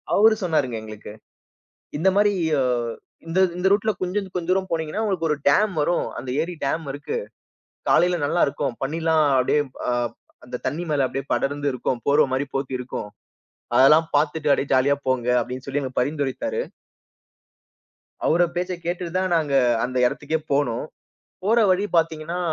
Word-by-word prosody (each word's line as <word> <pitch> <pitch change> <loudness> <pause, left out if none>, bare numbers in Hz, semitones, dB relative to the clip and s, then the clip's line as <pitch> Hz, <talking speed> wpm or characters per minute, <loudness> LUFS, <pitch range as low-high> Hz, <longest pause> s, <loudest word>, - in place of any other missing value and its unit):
அவரு 220 +1 +6
சொன்னாருங்க 150 -8 0
எங்களுக்கு. 110 -1 -9 0.8
இந்த 175 +6 +3
மாரி 205 0 +4 0.3
அ - - +2 0.7
இந்த 165 +3 0 0.2
இந்த 180 +1 +1
ரூட்ல 210 +2 +3
கொஞ்ச 185 +3 -1 0.2
கொஞ்ச 170 -2 -4
தூரம் 190 0 0
போனீங்கன்னா, 160 +4 -2
உங்களுக்கு 190 -6 0
ஒரு 150 - +2
டேம் 200 +8 +4
வரும், 175 +4 +1
அந்த 130 - -6
ஏரி 175 +2 -4
டேம் 160 +4 -1
இருக்கு. 145 - -4 0.7
காலைல 175 0 +3
நல்லா 170 +4 +1
இருக்கும், 140 -2 -2
பனிலாம் 160 +2 +1
அப்டியே 140 +3 +2 0.3
அ, - - +2 0.5
அந்த - - -5
தண்ணி 165 +4 -2
மேல 140 -3 +2
அப்டியே 135 +1 -5
படர்ந்து 145 +1 -1
இருக்கும், 125 0 -2
போர்வ 140 +1 +5
மாரி 135 +2 0
போத்தி 135 -1 -2
இருக்கும். 125 -4 -5 0.7
அதெல்லாம் 150 +5 +6
பாத்துட்டு 150 0 +1
அப்டியே 140 - 0
ஜாலியா 135 +2 +3
போங்க, 130 -2 0
அப்டின்னு 125 +2 -6
சொல்லி 140 +1 -1
எங்களுக்கு 130 -1 -2
பரிந்துரைத்தாரு. 150 - -2 1.6
அவர 170 +2 +3
பேச்ச 180 +1 -2
கேட்டுட்டுதான் 180 +1 -2
நாங்க 150 -3 -1 0.3
அந்த 130 +1 -2
எடத்துக்கே 150 +5 -2
போனோம். 140 -4 0 0.6
போற 225 +4 +3
வழி 185 +2 +2
பாத்தீங்கன்னா 165 +1 0
155 Hz, 150 wpm, -23 LUFS, 135-180 Hz, 1.6 s, அவரு